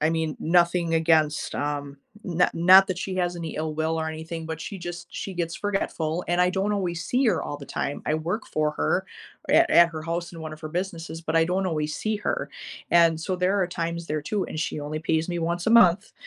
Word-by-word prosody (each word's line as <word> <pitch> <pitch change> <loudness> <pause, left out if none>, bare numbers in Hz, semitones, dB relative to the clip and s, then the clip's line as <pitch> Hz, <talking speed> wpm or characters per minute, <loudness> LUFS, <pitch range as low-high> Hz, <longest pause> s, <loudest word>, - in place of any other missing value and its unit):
I 155 - +3
mean, 160 -2 -1
nothing 170 0 +2
against, 155 -2 +2
um, 145 -1 -3 0.3
no 180 -1 +2
not 185 +3 +7
that 185 - -3
she 190 0 -4
has 175 -1 0
any 165 -2 -5
ill 155 0 -2
will 160 +1 -1
or 160 - -2
anything, 160 +1 -6
but 160 -1 -4
she 195 +2 -6
just 175 0 -7
she 195 - -6
gets 170 -1 -2
forgetful, 180 -5 -2
and 175 +1 +1
I 180 - +4
don't 195 +2 0
always 175 -4 -2
see 255 +1 +1
her 220 - +2
all 145 - -5
the 140 - -10
time, 140 - -3
I 155 - +1
work 170 +7 -3
for 155 0 0
her 75 - 0 0.5
at - - +5
at 170 0 +7
her 160 - -6
house 170 +1 -3
and 165 - -9
one 155 -1 -6
of 155 - -16
her 155 - -6
businesses, 170 -1 -4
but 165 0 -2
I 165 - +5
don't 185 +2 0
always 155 -3 -2
see 215 0 -1
her, 205 - -2 0.4
and 165 -2 +4
so 185 +3 -2
there 190 +2 +1
are 180 - +2
times 170 -1 -4
there 150 -1 -2
too 200 +4 -1
and 155 - -6
she 155 - -2
only 150 +1 -4
pays 160 0 0
me 175 - -2
once 170 +1 -2
a - - +3
month, 210 -3 +5
170 Hz, 235 wpm, -25 LUFS, 160-180 Hz, 0.5 s, not